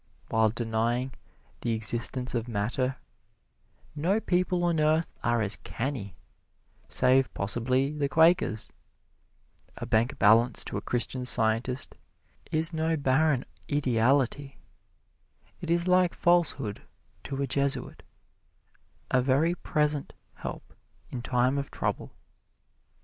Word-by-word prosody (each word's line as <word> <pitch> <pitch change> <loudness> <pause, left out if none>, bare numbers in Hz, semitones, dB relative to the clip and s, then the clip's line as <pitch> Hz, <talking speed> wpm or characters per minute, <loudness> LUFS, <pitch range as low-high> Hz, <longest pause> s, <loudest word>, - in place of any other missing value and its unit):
While 110 -1 +3
denying 120 +3 -1 0.5
the 115 - -1
existence 120 +3 +1
of 115 -1 -2
matter, 120 +4 -1 1.0
no 175 +8 +1
people 180 -3 0
on 170 -2 +1
earth 155 +1 +1
are 120 -1 +1
as 105 -1 0
canny, 120 -7 -5 0.7
save 130 +1 +3
possibly 125 +7 -1
the 145 -2 -1
Quakers. 160 - +2 1.0
A - - -5
bank 115 +5 +1
balance 115 +4 +4
to - - -4
a - - -3
Christian 125 +1 0
Scientist 125 +1 0 0.5
is 160 +2 +1
no 160 0 0
barren 140 0 +2 0.3
ideality. 135 +1 +1 1.0
It 170 - -7
is 170 +1 +1
like 180 -1 +3
falsehood 160 -11 +1 0.4
to 135 0 -4
a 140 - +1
Jesuit 140 +1 -1 1.1
a 130 - +4
very 140 +6 +2
present 150 -4 -1 0.2
help - - -8 0.4
in 125 - -4
time 125 +3 +1
of 140 - -5
trouble. - - -3
130 Hz, 110 wpm, -28 LUFS, 120-155 Hz, 1.1 s, balance